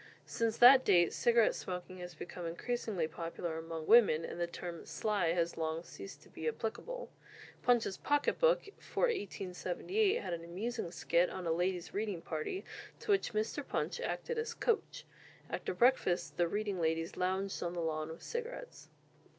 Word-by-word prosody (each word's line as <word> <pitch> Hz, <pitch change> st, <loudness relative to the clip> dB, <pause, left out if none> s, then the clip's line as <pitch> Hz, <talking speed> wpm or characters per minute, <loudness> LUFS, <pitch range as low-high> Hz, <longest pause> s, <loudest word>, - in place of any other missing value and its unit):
Since 225 Hz, -1 st, -1 dB
that 255 Hz, +2 st, +9 dB
date 175 Hz, -6 st, +4 dB
cigarette 235 Hz, -2 st, +4 dB
smoking 180 Hz, 0 st, -6 dB
has 175 Hz, -1 st, -7 dB
become 175 Hz, +1 st, -6 dB
increasingly 195 Hz, -1 st, -2 dB
popular 165 Hz, 0 st, -4 dB
among 160 Hz, -1 st, -5 dB
women, 195 Hz, -8 st, +6 dB
and -, -, -6 dB
the 170 Hz, -, +1 dB
term 170 Hz, 0 st, -6 dB
"sly" 200 Hz, -6 st, 0 dB
has 170 Hz, -1 st, 0 dB
long 160 Hz, +1 st, -2 dB
ceased 100 Hz, -, -10 dB
to -, -, -18 dB
be 160 Hz, -, -5 dB
applicable. -, -, -4 dB, 0.5 s
"Punch's 235 Hz, -5 st, +2 dB
Pocket 290 Hz, 0 st, +1 dB
Book" -, -, +4 dB
for -, -, -4 dB
1878 385 Hz, -, 0 dB
had -, -, -4 dB
an 165 Hz, -1 st, -4 dB
amusing 200 Hz, +5 st, -3 dB
skit 170 Hz, +1 st, +2 dB
on 185 Hz, -1 st, -6 dB
a 165 Hz, -, +1 dB
ladies' 175 Hz, +1 st, -1 dB
reading 205 Hz, -5 st, -2 dB
party, 160 Hz, -, -3 dB, 0.3 s
to -, -, -1 dB
which 390 Hz, -, +2 dB
Mr. 220 Hz, +7 st, -1 dB
Punch 475 Hz, -, -2 dB
acted 475 Hz, -1 st, -2 dB
as 465 Hz, 0 st, -3 dB
"coach." 460 Hz, -2 st, -1 dB, 0.5 s
After -, -, -2 dB
breakfast 210 Hz, -3 st, +2 dB
the 175 Hz, -, +2 dB
reading 205 Hz, -1 st, -2 dB
ladies 165 Hz, 0 st, 0 dB
lounged 190 Hz, +2 st, -1 dB
on 175 Hz, 0 st, -2 dB
the 175 Hz, -, -3 dB
lawn 155 Hz, -1 st, -1 dB
with 160 Hz, -, -9 dB
cigarettes. 485 Hz, +1 st, -6 dB
185 Hz, 165 wpm, -34 LUFS, 170-240 Hz, 0.5 s, that